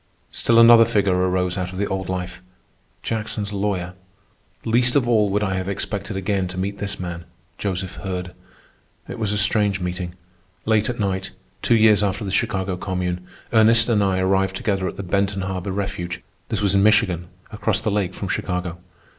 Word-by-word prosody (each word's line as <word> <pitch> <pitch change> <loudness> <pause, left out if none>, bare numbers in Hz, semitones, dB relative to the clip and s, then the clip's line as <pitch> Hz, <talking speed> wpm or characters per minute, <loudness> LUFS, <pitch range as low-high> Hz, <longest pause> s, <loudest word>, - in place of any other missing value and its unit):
Still 115 - +2
another 115 0 +9
figure 100 -4 +2
arises 90 0 0
out 90 0 -3
of 95 - -8
the 100 - 0
old 95 -1 -3
life—Jackson's 95 +3 -6
lawyer. 95 -3 -2 0.7
Least 120 +3 +3
of 135 -4 +3
all 110 -4 +3
would 105 +2 0
I 95 -2 0
have 95 0 -2
expected 100 0 -3
again 95 -1 -1
to 90 0 -7
meet 100 +2 -3
this 100 -1 -3
man, 85 -2 -5 0.3
Joseph 95 -2 -3
Hurd. 90 -2 -5 0.7
It - - -7
was 105 -3 0
a 105 - 0
strange 105 -1 +2
meeting. 90 -1 -4 0.5
Late 110 0 +2
at 120 -1 -4
night, 95 -2 -1 0.3
two 120 - +3
years 110 -2 +5
after 100 +1 -1
the 95 - -3
Chicago 95 -4 -1
Commune, 90 -1 -3 0.3
Ernest 115 +1 +5
and 105 -3 +3
I 95 -1 +1
arrived 95 0 +1
together 95 -2 -1
at - - -6
the 100 - -4
Benton 100 +1 0
Harbor 95 +1 -3
refuge. 95 -3 -4 0.2
This 105 -1 -1
was 100 -2 +3
in 100 - +4
Michigan, 100 -5 +3 0.2
across 105 -1 0
the 110 - -1
lake 100 -3 -1
from 100 - -4
Chicago. 90 -1 -3
100 Hz, 180 wpm, -22 LUFS, 90-105 Hz, 0.7 s, another